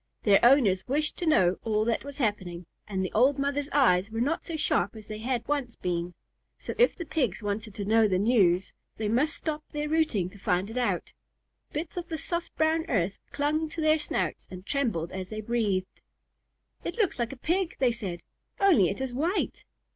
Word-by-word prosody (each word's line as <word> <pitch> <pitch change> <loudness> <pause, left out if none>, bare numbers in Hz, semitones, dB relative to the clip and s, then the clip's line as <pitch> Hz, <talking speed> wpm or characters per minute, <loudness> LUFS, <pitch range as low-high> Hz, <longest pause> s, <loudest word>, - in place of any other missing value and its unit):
Their 200 -2 +5
owners 235 -8 +5
wished 300 +4 0
to 345 - -3
know 185 - +4
all 215 -1 +1
that 230 -1 0
was 285 0 -8
happening, 190 - -2 0.2
and 190 -2 -2
the - - -4
old 260 +5 +4
mother's 280 +1 -1
eyes 200 -9 +4
were 225 +1 -4
not 300 +9 0
so 335 - -5
sharp 205 - +1
as 215 -1 -10
they 215 0 -6
had 240 0 -2
once 280 -5 -1
been, 175 -1 -3 0.4
so - - -6
if 485 - +5
the 345 - -6
Pigs 250 - -1
wanted 205 0 -3
to 200 - -4
know 220 +1 +4
the 185 -2 +1
news, 195 -4 +3 0.2
they 215 - -2
must 255 +9 +1
stop 305 -1 -4
their 300 0 -3
rooting 305 - +1
to 200 - -14
find 185 +3 0
it 240 - -6
out. 245 - -1 0.6
Bits 310 +4 -5
of 350 0 -4
the 320 - -2
soft 340 +3 -3
brown 320 +1 +2
earth 195 -4 0
clung 305 +2 0
to 330 - -7
their 310 0 +3
snouts 295 - -2
and 185 0 -9
trembled 220 - -1
as 185 0 -5
they 215 - -5
breathed. 210 -5 -1 0.8
"It - - -4
looks 410 - +1
like 235 -1 -1
a 275 - -8
Pig," 345 +6 0
they 255 -2 +3
said, 195 -7 -5 0.4
"only 335 - +5
it 200 - -4
is 265 -2 -3
white." 330 +10 -1
235 Hz, 200 wpm, -28 LUFS, 200-300 Hz, 0.8 s, Their